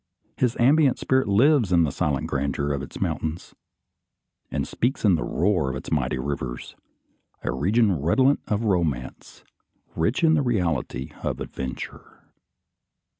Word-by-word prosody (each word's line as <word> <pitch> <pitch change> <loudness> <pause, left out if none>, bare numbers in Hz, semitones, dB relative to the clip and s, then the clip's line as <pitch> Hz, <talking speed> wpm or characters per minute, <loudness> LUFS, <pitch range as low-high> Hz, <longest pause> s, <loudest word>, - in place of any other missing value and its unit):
His 125 -2 0
ambient 140 +2 +4
spirit 130 0 +1
lives 115 - +4
in 85 -1 +5
the 75 - 0
silent 75 -4 -1
grandeur 70 +1 -1
of 70 - -3
its 65 - -8
mountains, 80 +2 -3 1.0
and - - -2
speaks 125 0 -1
in 100 - +5
the 80 - +1
roar 90 -6 +1
of 65 - -4
its 65 - -7
mighty 65 -4 0
rivers: 65 -2 -5 0.7
a - - -1
region 100 - +2
redolent 130 - +3
of 105 +1 -1
romance, 85 - -2 0.5
rich 110 - 0
in 160 -1 +5
the 155 - +3
reality 85 - -1
of - - -3
adventure. 65 -1 -7
85 Hz, 140 wpm, -24 LUFS, -, 1.0 s, in